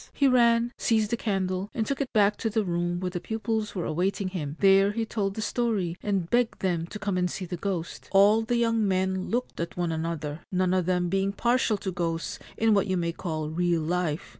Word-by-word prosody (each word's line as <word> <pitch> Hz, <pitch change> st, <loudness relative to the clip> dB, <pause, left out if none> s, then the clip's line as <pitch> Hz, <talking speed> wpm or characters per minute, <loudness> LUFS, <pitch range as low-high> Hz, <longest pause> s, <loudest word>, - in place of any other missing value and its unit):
He 280 Hz, -, +4 dB
ran, 235 Hz, -2 st, +4 dB
seized 220 Hz, -1 st, +1 dB
a -, -, +4 dB
candle, 195 Hz, -3 st, -2 dB
and 220 Hz, -, 0 dB
took 275 Hz, +3 st, -2 dB
it 270 Hz, -, -3 dB
back 210 Hz, -2 st, +4 dB
to 225 Hz, -, -1 dB
the 215 Hz, -1 st, 0 dB
room 175 Hz, 0 st, -1 dB
where 180 Hz, 0 st, -3 dB
the 175 Hz, -, -3 dB
pupils 220 Hz, +1 st, -3 dB
were 180 Hz, -, -2 dB
awaiting 185 Hz, +4 st, -1 dB
him; 155 Hz, -5 st, -5 dB
there 195 Hz, +1 st, +5 dB
he 225 Hz, +1 st, -1 dB
told 200 Hz, -3 st, -2 dB
the 220 Hz, -, -3 dB
story, 210 Hz, -7 st, -1 dB
and 195 Hz, -5 st, -1 dB
begged 240 Hz, +3 st, +1 dB
them 170 Hz, -3 st, 0 dB
to 210 Hz, -, -7 dB
come 200 Hz, -3 st, -1 dB
and 180 Hz, 0 st, +1 dB
see 185 Hz, -, -5 dB
the 175 Hz, -, -4 dB
ghost. 175 Hz, -2 st, -4 dB
All 205 Hz, +3 st, +6 dB
the 235 Hz, +2 st, 0 dB
young 230 Hz, -2 st, +2 dB
men 190 Hz, 0 st, 0 dB
looked 245 Hz, +2 st, -2 dB
at 170 Hz, +1 st, -4 dB
one 175 Hz, -2 st, 0 dB
another, 160 Hz, -2 st, -3 dB
none 185 Hz, -1 st, +1 dB
of 185 Hz, -2 st, +1 dB
them 180 Hz, -1 st, +1 dB
being 195 Hz, +1 st, 0 dB
partial 240 Hz, 0 st, +1 dB
to 190 Hz, -1 st, -4 dB
ghosts 165 Hz, -2 st, -3 dB, 0.2 s
in 225 Hz, -1 st, +3 dB
what 200 Hz, 0 st, +2 dB
you 190 Hz, -1 st, 0 dB
may 170 Hz, -1 st, 0 dB
call 155 Hz, -3 st, -4 dB
real 170 Hz, 0 st, +1 dB
life. 170 Hz, -2 st, -1 dB
195 Hz, 225 wpm, -27 LUFS, 175-220 Hz, 0.2 s, All